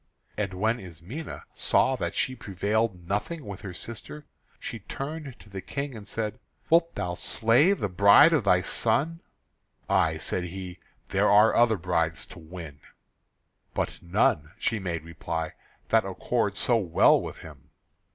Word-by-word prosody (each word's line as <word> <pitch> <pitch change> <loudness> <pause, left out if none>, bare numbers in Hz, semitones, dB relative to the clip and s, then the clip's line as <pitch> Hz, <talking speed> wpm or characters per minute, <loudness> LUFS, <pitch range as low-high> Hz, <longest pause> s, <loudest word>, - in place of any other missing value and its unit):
And 100 -3 -2
when 110 +5 +1
Ismené 95 - -8
saw 130 - +2
that - - -3
she 130 - +1
prevailed 100 -3 -1
nothing 135 - -2
with 100 -3 -7
her 100 - -6
sister, 115 +10 -8 0.3
she 115 - -6
turned 140 +5 -6
to - - -16
the 100 -2 -7
King 140 +2 -4
and 105 -1 -10
said: 110 -1 -3 0.3
"Wilt 165 0 +4
thou 90 -3 -2
slay 115 - +3
the 175 - -2
bride 100 - +7
of 150 -7 +3
thy 90 -2 +4
son?" 135 - 0 0.7
"Ay," - - +2
said 90 - -1
he, 90 0 -7 0.3
"there - - +2
are 105 +2 +6
other 115 -2 +4
brides 85 -2 -1
to - - -12
win!" 80 -3 -9 1.0
"But - - -2
none," 85 - +1
she 115 -1 0
made 85 -5 -3
reply, 80 0 -4 0.4
"that - - +4
accord - - -1
so 120 - +3
well 90 -7 +4
with - - -7
him." 75 -5 -13
100 Hz, 150 wpm, -27 LUFS, 90-120 Hz, 1.0 s, bride